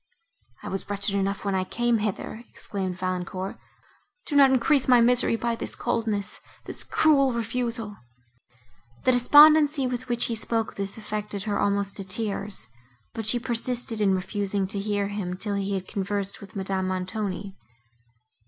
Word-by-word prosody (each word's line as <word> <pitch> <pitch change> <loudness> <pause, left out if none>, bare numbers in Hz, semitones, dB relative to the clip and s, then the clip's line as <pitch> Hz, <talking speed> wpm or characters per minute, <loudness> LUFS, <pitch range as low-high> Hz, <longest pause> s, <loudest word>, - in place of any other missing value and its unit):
"I - - -6
was 195 +1 -4
wretched 200 0 -1
enough 200 0 -1
when 200 - 0
I 190 -1 +1
came 240 +3 0
hither," 215 +2 -4
exclaimed 190 -3 -5
Valancourt, 185 +1 -4 0.7
"do 295 - -3
not 275 -1 +7
increase 265 +2 +2
my 250 -2 +6
misery 240 0 +3
by 235 0 -1
this - - -5
coldness—this 225 -4 -4
cruel 275 -4 +3
refusal." 230 -2 -3 1.1
The 255 - +4
despondency, 295 +3 +6
with 250 0 -4
which 240 0 +1
he 235 - -2
spoke 225 0 -1
this, 195 +1 -4
affected 210 -2 -4
her 210 -1 -1
almost 200 -1 0
to 195 - -4
tears, 200 - 0 0.5
but 225 -2 -3
she 240 - +3
persisted 240 -1 -1
in 195 -2 +3
refusing 195 +1 -1
to 200 -1 0
hear 205 0 -1
him, 190 -3 -4
till 205 +1 -1
he 200 0 -1
had 190 -1 -4
conversed 200 -1 -3
with 200 -1 -12
Madame 190 -1 -2
Montoni. 190 +1 -3
210 Hz, 155 wpm, -25 LUFS, 195-240 Hz, 1.1 s, not